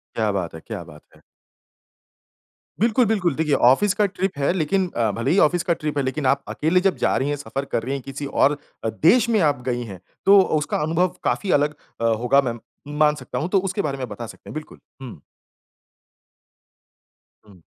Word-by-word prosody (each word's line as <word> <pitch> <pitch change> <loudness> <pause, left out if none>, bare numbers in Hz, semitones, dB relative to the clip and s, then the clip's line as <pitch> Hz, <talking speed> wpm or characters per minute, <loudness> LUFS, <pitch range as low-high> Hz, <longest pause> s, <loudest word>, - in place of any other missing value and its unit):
क्या 110 -2 +1
बात 90 -5 -3
है! 80 - -8
क्या 85 - -7
बात 75 -2 -14
है! - - -21 1.6
बिल्कुल, 230 +3 +3
बिल्कुल 195 -8 +1
देखिए 150 0 +1
ऑफ़िस 135 +13 +4
का 210 - +2
ट्रिप 185 -3 -3
है 140 +3 +1
लेकिन 185 +2 0
अ, 115 -2 +1
भले 115 +3 -2
ही 185 - +3
ऑफ़िस 175 0 +3
की 170 - +2
ट्रिप 150 -2 -4
है - - +2
लेकिन 130 +2 -2
आप 140 +2 +2
अकेले 165 +4 +1
जब 195 - +2
जा - - +2
रही 135 - 0
हैं 145 - -1
सफ़र 140 -1 -5
कर - - +1
रही 130 +4 -3
है 140 - -3
किसी 135 +2 -7
और 140 +1 +2 0.3
अ, - - +1
देश 180 - +3
में 225 -3 +2
आप 145 -6 +1
गई 120 -1 -1
हैं 95 - -11 0.3
तो 200 0 +8 0.2
उसका 150 - -2
अनुभव 165 +4 +1
काफ़ी 200 - -1
अलग 150 +1 0 0.3
अ, - - -1
होगा 120 +4 +3
मैं 120 -3 -3 0.4
मान 150 -1 +4
सकता - - -6
हूँ। 160 - -2
तो 195 - +3
उसके 190 +2 -2
बारे 140 -2 -3
में 130 - -3
बता 120 - -7
सकते - - -12
हैं। - - -9
बिल्कुल, 155 0 -8 0.2
हुँ। 120 - -9 2.3
हुँ। 100 -4 -18
145 Hz, 205 wpm, -22 LUFS, 125-180 Hz, 2.3 s, तो